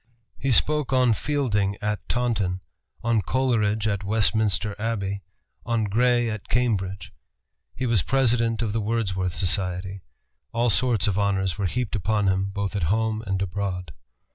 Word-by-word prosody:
He 135 - -1
spoke 150 +4 +2
on 125 -3 +4
Fielding 105 -8 0
at 105 0 -3
Taunton, 105 -7 0 0.4
on 115 -2 +2
Coleridge 110 -4 +1
at 100 -2 -1
Westminster 105 0 +1
Abbey, 100 -3 -2 0.4
on 115 -2 0
Gray 120 +3 +2
at 105 -3 -5
Cambridge. 100 -6 -1 0.6
He 130 - -2
was 115 -6 +3
President 115 -2 +2
of 105 -3 -2
the 115 - 0
Wordsworth 95 -5 -1
Society. 95 0 -1 0.5
All 120 0 +2
sorts 110 0 +2
of 100 -2 +1
honors 95 -2 0
were 100 - +1
heaped 120 +4 -2
upon 105 +1 0
him, 95 +1 +1
both 100 +1 -3
at 100 - -1
home 110 +1 +1
and 95 -1 0
abroad. 90 -3 -3
105 Hz, 145 wpm, -25 LUFS, 95-115 Hz, 0.6 s, on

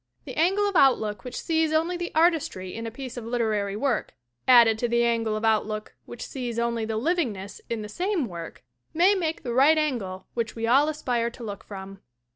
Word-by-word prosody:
The - - -7
angle 390 +5 +2
of 400 - -3
outlook 220 - +3
which 250 - -6
sees 320 -1 +1
only 325 +3 +1
the 350 0 -4
artistry 315 - +1
in 230 0 -5
a - - -2
piece 255 +1 -8
of 240 - -5
literary 220 -4 -1
work 240 0 -1 0.3
added 235 -3 +7
to 240 - +1
the 235 0 +2
angle 230 -2 +1
of 215 +1 -2
outlook 215 -1 0
which 240 - -7
sees 245 -3 -5
only 235 -1 0
the 220 0 -2
livingness 230 - -2
in 230 -2 -2
the - - -6
same 355 - -1
work 170 -3 -8 0.3
may 360 +5 +5
make 330 -5 -2
the 240 - -3
right 280 +6 +5
angle 230 -12 -2
which 230 -1 -3
we 225 0 -2
all 275 +6 +4
aspire 245 -6 -1
to 235 +1 -11
look 205 -3 -6
from. 195 -1 -9
235 Hz, 205 wpm, -26 LUFS, 215-310 Hz, 0.3 s, added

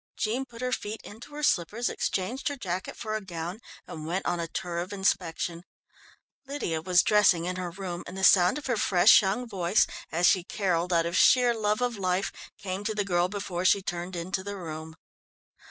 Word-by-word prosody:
Jean 240 +5 -1
put 235 -2 -12
her 250 - -1
feet 215 -2 -3
into 240 +8 -11
her 300 - -5
slippers, 215 - +1
exchanged 235 +9 -2
her 285 - -1
jacket 185 -7 -4
for 215 -1 -3
a 215 - -2
gown, 175 +1 -6 0.3
and 155 -1 -8
went 180 +3 -2
on 175 - 0
a 165 - -2
tour 170 0 -4
of 180 +3 -4
inspection. 175 -3 -1 0.8
Lydia 220 - -2
was 180 +1 +4
dressing 200 -5 +4
in 180 +1 -2
her 180 -1 -3
room, 175 -1 -6
and 185 - -8
the 190 - -4
sound 185 +4 +6
of 300 - -7
her 240 -4 0
fresh, 180 -3 +6
young 210 +5 -1
voice, 190 -1 +2 0.3
as 170 +2 +2
she 180 0 +4
carolled 180 -2 -1
out 165 -1 +3
of 170 +1 -2
sheer 245 +2 +5
love 215 0 0
of 245 -3 -1
life, 185 +1 0 0.3
came 190 +1 -4
to 215 0 -2
the 205 -1 0
girl 175 -2 +2
before 190 -3 -4
she 195 +1 +4
turned 175 0 -4
into 185 +2 -3
the 200 0 -5
room. 160 -2 -7
185 Hz, 200 wpm, -27 LUFS, 175-215 Hz, 0.8 s, sound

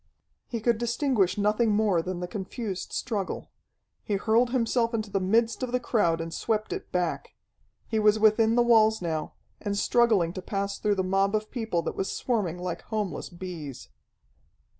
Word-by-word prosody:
He 230 -2 -4
could 230 0 +2
distinguish 235 - +1
nothing 215 +2 +2
more 205 -5 +2
than 180 +1 -4
the 180 - -3
confused 195 0 -5
struggle. 205 -6 -3 0.5
He 210 - -1
hurled 230 +4 +2
himself 235 -1 +1
into 215 -2 -3
the 195 - +1
midst 225 +6 +1
of 255 -1 -2
the 250 - +1
crowd 205 -9 +1
and 165 0 -5
swept 215 -1 -1
it - - -7
back. 180 -2 -2 0.5
He 220 - 0
was 210 0 +4
within 220 +1 +4
the 240 - +5
walls 220 -2 +5
now, 160 -3 -3 0.3
and 205 -1 -2
struggling 210 -7 +3
to 185 - -5
pass 200 +1 -3
through 210 -1 +1
the 190 - 0
mob 195 +2 +1
of 215 0 -2
people 220 -9 -1
that - - -3
was 190 - -2
swarming 205 -9 -1
like 180 -1 -4
homeless 210 -4 -3
bees. 170 -7 -8
210 Hz, 175 wpm, -27 LUFS, 185-230 Hz, 0.5 s, the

